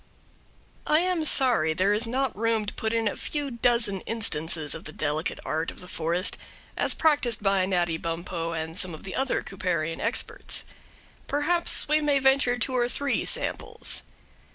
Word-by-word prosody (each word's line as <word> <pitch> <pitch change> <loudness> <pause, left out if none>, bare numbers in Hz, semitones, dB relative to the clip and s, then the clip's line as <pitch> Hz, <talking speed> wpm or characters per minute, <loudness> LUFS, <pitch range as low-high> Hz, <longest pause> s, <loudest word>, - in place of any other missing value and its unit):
I 305 +2 +4
am 360 -2 +1
sorry 235 - +3
there 190 +4 +3
is 220 +3 0
not 260 +1 0
room 225 0 +1
to 205 - -4
put 220 - -2
in 225 -1 +1
a - - -1
few 290 -2 -3
dozen 235 -4 +2
instances 160 -8 -1
of 160 - -7
the 155 - -6
delicate 155 +2 -2
art 160 +1 -1
of - - -10
the 180 - -10
forest, 170 +2 0 0.4
as - - +1
practised 255 -9 +2
by 195 -2 +3
Natty 175 -3 +1
Bumppo 165 0 -3
and 160 0 -4
some 185 -3 -2
of - - -13
the 190 - -6
other 265 0 0
Cooperian 170 -4 -2
experts. 230 +3 -1 0.6
Perhaps 340 +4 +2
we 305 +1 +3
may 290 -2 +3
venture 265 -2 +3
two 255 +2 0
or 240 -1 +2
three 280 +3 -1
samples. - - -1
210 Hz, 170 wpm, -26 LUFS, 170-260 Hz, 0.6 s, I